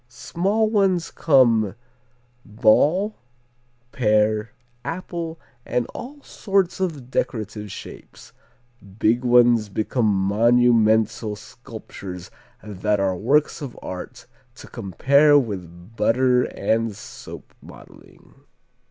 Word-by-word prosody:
Small 195 - -1
ones 195 -5 +1
come 115 - +3 0.7
ball, 145 - +2 0.7
pear, 110 -1 +1 0.3
apple, 165 +2 -5 0.2
and 125 -1 -1
all 285 +3 -9
sorts 195 -3 -1
of 150 -9 -4
decorative 105 -4 -3
shapes, - - -12 0.6
big 115 +3 +2
ones 120 -3 +4
become 110 +3 -1
monumental 110 +1 +2
sculptures 105 -6 -10 0.3
that 105 0 -1
are 95 -1 0
works 145 - +1
of 135 -4 -7
art 90 -1 -8 0.3
to - - -12
compare 140 - +3
with 95 - -5
butter 125 +2 +2
and 110 +1 -1
soap 105 - -11
modeling. - - -16
115 Hz, 90 wpm, -22 LUFS, 105-145 Hz, 0.7 s, ones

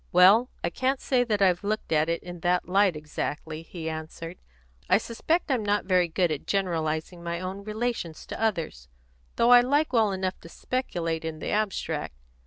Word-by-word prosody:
"Well, 200 +8 +6
I - - 0
can't 260 +1 0
say 255 -2 +2
that 210 -4 +1
I've 180 -1 +3
looked 215 -2 -2
at 155 0 +3
it 170 - -1
in 175 -1 -8
that 180 +1 +1
light 195 -1 +3
exactly," 155 +1 -4
he 165 0 -7
answered. 160 +2 -6 0.5
"I 185 - +6
suspect 295 - -1
I'm 245 -5 +1
not 205 0 +1
very 180 -2 +3
good 170 0 +1
at 150 - -4
generalising 170 -3 -1
my 170 0 -3
own 190 +2 -5
relations 215 -6 -3
to - - -7
others, 165 - -1 0.5
though 235 - +4
I 245 0 +9
like 285 +4 +1
well 220 -4 +4
enough 190 -1 -2
to 165 - -13
speculate 170 -10 -3
in 160 -1 -4
the - - -5
abstract. 175 - -1
185 Hz, 185 wpm, -27 LUFS, 165-215 Hz, 0.5 s, I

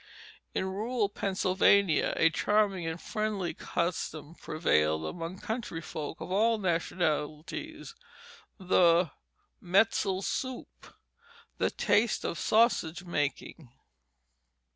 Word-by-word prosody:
In - - 0
rural 210 +3 -1
Pennsylvania 190 -3 +2
a 165 - +4
charming 200 -3 +1
and 165 +1 -4
friendly 215 -4 -2
custom 165 -3 -3
prevailed 80 - 0
among 165 - -5
country 220 -6 -4
folk 160 0 -6
of - - -7
all 225 +4 +3
nationalities 175 - -2 0.6
the 175 -4 +3 0.5
"metzel 190 0 +2
soup," 260 +3 -5 0.6
the - - +2
"taste" 220 +1 +1
of 170 - -3
sausage 195 -6 +2
making. 150 -3 -3
185 Hz, 95 wpm, -29 LUFS, 165-210 Hz, 0.6 s, a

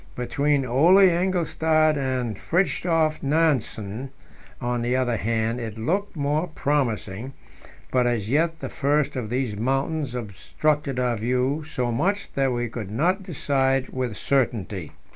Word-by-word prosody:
Between 140 +3 0
Ole 170 +11 +6
Engelstad 160 -3 +2
and 130 -5 -1
Fridtjof 165 - +1
Nansen, 135 -6 0 0.5
on 120 -1 -1
the 120 +1 0
other 125 -2 +1
hand, 115 +2 -1
it 115 -2 -5
looked 185 - -1
more 150 +3 0
promising, 130 - -2 0.6
but 125 -1 +3
as 115 -4 -1
yet 160 +3 +1
the - - -4
first 145 0 0
of 120 -5 -3
these 125 -3 -1
mountains 135 +4 -1
obstructed 135 - -1
our 125 -2 +1
view 125 +7 0
so 125 -5 -2
much 195 - -1
that 135 -1 +1
we 120 0 -1
could 110 -3 -6
not 170 - +1
decide 135 -6 0
with 125 -5 -3
certainty. 110 - -1
135 Hz, 135 wpm, -24 LUFS, 120-155 Hz, 0.6 s, Ole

